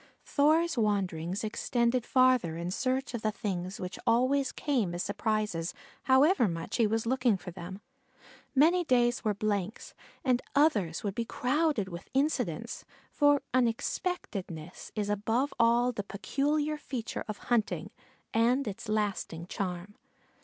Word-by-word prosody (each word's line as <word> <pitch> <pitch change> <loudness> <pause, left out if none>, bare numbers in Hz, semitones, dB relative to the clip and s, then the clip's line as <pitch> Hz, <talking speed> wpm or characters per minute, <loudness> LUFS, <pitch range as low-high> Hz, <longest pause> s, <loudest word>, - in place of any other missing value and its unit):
Thor's 315 +1 +3
wanderings 190 -3 0
extended 235 +2 0
farther 255 -11 +3
in 170 +1 -3
search 260 +5 -1
of 235 - -3
the 215 - +1
things 190 -3 -4
which 180 0 -5
always 255 +4 +3
came 235 - -1
as 175 - -2
surprises 210 -5 -1 0.3
however 265 - +5
much 165 -2 -3
he 230 -3 +4
was 225 +1 0
looking 250 -3 +2
for 180 - -8
them. 185 +3 -8 0.7
Many 335 +6 +5
days 245 -5 +2
were 210 -2 +1
blanks 205 0 -2 0.3
and 250 -1 +3
others 210 - +2
would 200 -2 -2
be 235 - -1
crowded 255 -2 0
with 170 -1 -8
incidents, 290 +3 -1 0.3
for 290 -2 +4
unexpectedness 225 - -2
is 210 -2 -1
above 225 +7 0
all 235 +1 +4
the 220 - -3
peculiar 290 +10 -1
feature 250 -6 -4
of 215 -2 -4 0.2
hunting, 225 -2 0 0.4
and 240 +4 +3
its 205 +2 -6
lasting 200 -6 -1
charm. 180 0 -4
225 Hz, 135 wpm, -30 LUFS, 195-260 Hz, 0.7 s, however